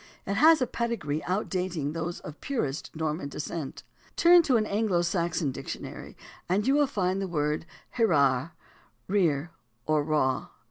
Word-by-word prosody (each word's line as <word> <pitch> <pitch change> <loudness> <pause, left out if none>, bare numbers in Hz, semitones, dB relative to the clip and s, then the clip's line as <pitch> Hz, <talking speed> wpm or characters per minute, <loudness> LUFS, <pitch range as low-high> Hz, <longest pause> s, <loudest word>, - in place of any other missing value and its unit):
It 200 - -1
has 310 +5 +6
a - - +2
pedigree 225 -12 -2
outdating 180 -5 -1
those 165 +1 -4
of 150 0 -10
purest 160 - -2
Norman 155 -1 -2
descent. 150 0 -5 0.3
Turn 345 0 +7
to 275 -7 +3
an 215 - +1
Anglo 200 -4 +1
Saxon 170 -3 0
dictionary - - -7 0.3
and 200 +4 +1
you 270 - +3
will 290 0 +4
find 190 -6 -1
the 195 - -2
word, 150 -1 -1 0.3
"Hrere 145 - +3 0.3
— - - -37
rear 160 -4 +2 0.3
or 155 -1 +2
raw." 145 -4 +1
175 Hz, 150 wpm, -28 LUFS, 150-210 Hz, 0.3 s, Turn